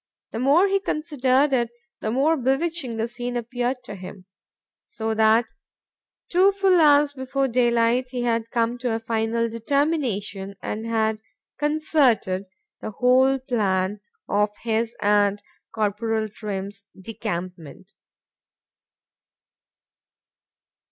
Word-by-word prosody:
—The 225 - -4
more 290 +10 +4
he 395 0 +2
considered 285 -5 +1
it, 240 -3 +1 0.3
the 215 - -3
more 275 +8 +2
bewitching 270 -1 -1
the 225 +1 -1
scene 245 +1 -4
appeared 245 +2 -3
to 230 - -8
him;—so 195 +3 -9
that, 220 +1 +4 0.8
two 370 +3 +4
full 385 -3 +3
hours 290 -1 +5
before 270 0 -1
day 245 -1 +2
light, 235 +2 +2
he 250 -1 -3
had 230 -1 0
come 235 +1 0
to 245 -2 -1
a - - -2
final 225 0 -1
determination 230 -6 -1
and 220 +2 -5
had 220 -1 0 0.4
concerted 290 -11 +1 0.3
the - - -5
whole 255 +4 +3
plan 205 -6 -1 0.3
of 205 +1 +2
his 230 0 -1
and 205 0 +2 0.3
Corporal 220 +1 -1
Trim's 200 -1 -6
decampment. 185 -2 -6
230 Hz, 110 wpm, -23 LUFS, 215-265 Hz, 0.8 s, hours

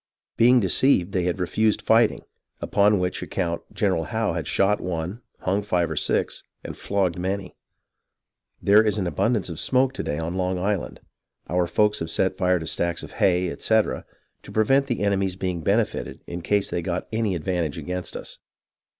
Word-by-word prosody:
being 125 +2 +6
deceived 100 -2 +2
they 90 -2 0
had 90 +1 -1
refused 105 +5 +1
fighting, 115 0 +3 0.4
upon 105 +1 +3
which 90 0 -2
account 85 -3 -2
General - - 0
Howe - - -1
had - - -3
shot 100 +1 +2
one, 90 +5 -4 0.2
hung 95 +2 0
five 90 -4 0
or - - -2
six, - - 0 0.2
and - - -6
flogged 95 -4 -1
many.... 95 +1 -3 1.0
There 100 +2 +6
is 105 -1 0
an 95 - -1
abundance 105 +6 0
of 85 -3 -6
smoke 130 +4 +2
to - - -4
day 75 - -3
on 80 +2 -3
Long 95 0 0
Island, 95 0 -2 0.5
our 90 0 +1
folks 105 +3 +2
having 80 - -3
set 95 +3 +1
fire 90 -1 +2
to 80 - -5
stacks 85 +1 -1
of - - -9
hay, 90 -1 +3
etc., 110 -1 +1 0.4
to - - -12
prevent 135 +6 +3
the 120 -5 -2
enemy's 100 -2 +1
being 90 -3 -3
benefited 105 +5 -1
in 85 0 -6
case 100 +3 0
they 85 - -1
got 90 +1 -3
any 110 -4 0
advantage 85 -2 -2
against 90 +3 -4
us. - - -7
95 Hz, 175 wpm, -24 LUFS, 90-105 Hz, 1.0 s, being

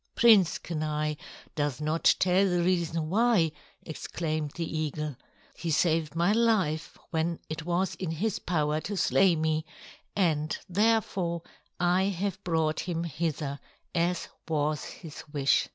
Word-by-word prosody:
"Prince 215 -7 +6
Kenai 155 -2 -2 0.4
does 145 -3 -1
not 155 +2 +3
tell 190 +2 +3
the 175 -1 +1
reason 170 -3 0
why," 215 -6 +3 0.3
exclaimed 155 -1 -3
the 170 - -2
eagle. 150 -1 -3 0.4
"He 170 - -5
saved 160 -1 +1
my 170 +4 +3
life 210 -9 +1
when 165 +1 0
it 160 +1 -5
was 175 +2 0
in 185 - -4
his 190 +6 -1
power 155 -2 0
to 205 +3 -4
slay 185 -1 +4
me, 155 0 0 0.5
and, 160 -5 +1
therefore, 190 -4 +1 0.4
I 180 +2 +3
have 195 0 -2
brought 160 -2 +1
him 170 -1 -2
hither, 155 -3 -2 0.3
as 175 0 0 0.2
was 150 -2 0
his 160 -4 -9
wish." 140 -2 +2
165 Hz, 135 wpm, -28 LUFS, 155-185 Hz, 0.5 s, Prince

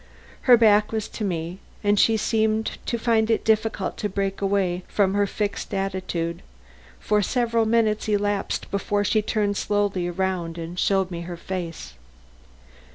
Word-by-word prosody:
Her 245 - +10
back 215 -2 +4
was 220 -2 -2
to 220 - -6
me 175 -1 -3 0.2
and 205 0 +3
she 225 -1 +4
seemed 220 0 0
to 235 - 0
find 225 -1 +2
it 225 - +1
difficult 220 -2 0
to 210 - -2
break 195 0 -2
away 195 -3 +1
from 195 -2 +1
her 205 0 +2
fixed 205 0 -3
attitude; 185 -3 -2 0.6
for 210 0 +1
several 230 +1 +1
minutes 220 -2 +1
elapsed 205 -1 -1
before 205 +1 0
she 210 +1 +2
turned 205 -1 0
slowly 205 -3 0
about 175 -2 -2
and 170 +2 -6
showed 190 -2 +1
me 170 -1 -4
her 175 0 -6
face. 170 - -6
205 Hz, 155 wpm, -24 LUFS, 185-215 Hz, 0.6 s, Her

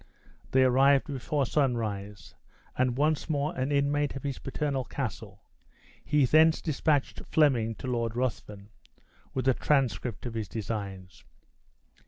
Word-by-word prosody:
They 130 0 +4
arrived 135 +2 +4
before 140 0 -2
sunrise, 110 -8 -2 0.4
and 125 -1 +1
once 155 +2 +1
more 150 +2 -1
an 130 +2 -1
inmate 145 0 +1
of 135 - -6
his 140 -2 -3
paternal 140 -1 -2
castle, - - -6 0.6
he 150 -2 +3
thence 160 +4 +5
dispatched 150 -2 0
Fleming 120 -8 +2
to - - -9
Lord 115 -3 -1
Ruthven, 105 -5 -4 0.7
with 130 0 -1
a 130 - +5
transcript 125 -7 0
of 120 - -4
his 110 -2 -3
designs. 95 -5 -6
130 Hz, 130 wpm, -28 LUFS, 115-145 Hz, 0.7 s, thence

